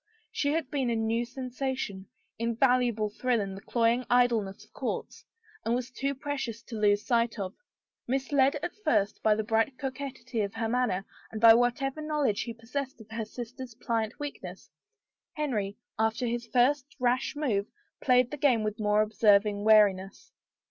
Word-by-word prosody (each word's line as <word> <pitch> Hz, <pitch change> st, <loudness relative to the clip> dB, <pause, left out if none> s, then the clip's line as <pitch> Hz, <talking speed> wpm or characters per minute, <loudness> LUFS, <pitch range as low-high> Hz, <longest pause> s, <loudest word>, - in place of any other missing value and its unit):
She 285 Hz, -, 0 dB
had 315 Hz, -5 st, -2 dB
been 270 Hz, -4 st, 0 dB
a 235 Hz, -, +1 dB
new 225 Hz, +1 st, 0 dB
sensation 255 Hz, -5 st, -4 dB, 0.2 s
— -, -, -42 dB
invaluable 235 Hz, -2 st, +2 dB
thrill 245 Hz, +2 st, 0 dB
in 195 Hz, -2 st, -3 dB
the 195 Hz, -, -9 dB
cloying 235 Hz, +2 st, +1 dB
idleness 235 Hz, -5 st, +2 dB
of -, -, -32 dB
courts! -, -, -4 dB, 0.2 s
— 435 Hz, 0 st, -28 dB
and 230 Hz, -, +1 dB
was 250 Hz, +1 st, -3 dB
too 275 Hz, +2 st, -2 dB
precious 265 Hz, -5 st, -4 dB
to 225 Hz, -3 st, -7 dB
be 210 Hz, -, +5 dB
lost 205 Hz, 0 st, +1 dB
sight 235 Hz, -2 st, +1 dB
of. 190 Hz, -2 st, -4 dB, 0.5 s
Misled 270 Hz, +2 st, +2 dB
at 350 Hz, -, -3 dB
first 205 Hz, -10 st, +1 dB
by 215 Hz, -1 st, +4 dB
the 220 Hz, -, -1 dB
bright 225 Hz, +4 st, +1 dB
coquetry 260 Hz, -4 st, -4 dB
of 200 Hz, +1 st, -3 dB
her 225 Hz, 0 st, -1 dB
manner, 225 Hz, -5 st, 0 dB, 0.3 s
and 220 Hz, -, -5 dB
by 225 Hz, 0 st, +9 dB
whatever 245 Hz, +5 st, +1 dB
knowledge 300 Hz, -8 st, 0 dB
he 235 Hz, -, -4 dB
possessed 255 Hz, +3 st, -5 dB
of 220 Hz, 0 st, -14 dB
her 225 Hz, 0 st, -3 dB
sister's 245 Hz, +2 st, -8 dB
pliant 225 Hz, +2 st, -2 dB
weakness, 290 Hz, -1 st, -7 dB, 0.6 s
Henry, 215 Hz, -10 st, -2 dB, 0.2 s
after 220 Hz, +3 st, +1 dB
66 240 Hz, 0 st, -2 dB
HOPE -, -, -33 dB
RENEWED 245 Hz, +2 st, +6 dB
his 290 Hz, -, -5 dB
first 280 Hz, +4 st, -26 dB
rash 250 Hz, +3 st, +1 dB
move, 220 Hz, -9 st, 0 dB, 0.3 s
played 250 Hz, -1 st, +3 dB
the 295 Hz, -, -4 dB
game 255 Hz, -6 st, +3 dB
with 215 Hz, +1 st, -3 dB
more 210 Hz, 0 st, +3 dB
observing 210 Hz, -1 st, +3 dB
wariness. 205 Hz, -3 st, +3 dB
235 Hz, 180 wpm, -29 LUFS, 215-260 Hz, 0.6 s, by